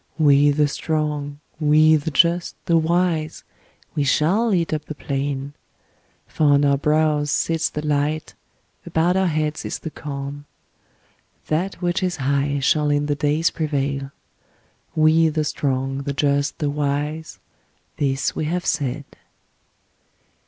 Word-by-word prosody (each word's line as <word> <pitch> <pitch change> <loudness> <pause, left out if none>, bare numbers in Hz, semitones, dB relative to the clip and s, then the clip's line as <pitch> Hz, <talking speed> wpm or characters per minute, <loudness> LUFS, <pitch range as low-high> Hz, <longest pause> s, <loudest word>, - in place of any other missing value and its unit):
We 145 -2 +5
the 145 +1 +2
strong, 150 -1 -3 0.2
we 155 +1 +5
the 150 +1 -1
just, 170 +4 +2
the 170 - +2
wise, 165 -1 0 0.5
we 150 - 0
shall 180 - +2
eat 170 -4 +1
up 150 -1 -3
the 155 - -7
plain. 140 0 -3 0.7
For 155 - -1
on 145 0 +4
our 140 0 +4
brows 150 0 +1
sits 165 +2 0
the 150 0 -5
light, 150 +1 -1 0.5
about 170 +3 +1
our 190 0 +2
heads 155 -1 -1
is - - -4
the 160 - -7
calm. 145 0 -6 1.0
That 180 +5 -2
which 175 +2 0
is 185 -1 -1
high 140 +1 0
shall 150 +2 +2
in 145 0 +1
the 145 - 0
days 150 +3 +1
prevail. 140 -3 -2 0.8
We 160 +1 +4
the 155 0 -1
strong, 135 -2 -2
the 140 0 -3
just, 140 0 0
the 145 -2 -1
wise, 150 +2 -2 0.6
this 135 -2 0
we 155 - -2
have 175 +3 -2
said!' 140 -3 -1
150 Hz, 140 wpm, -22 LUFS, 140-160 Hz, 1.0 s, We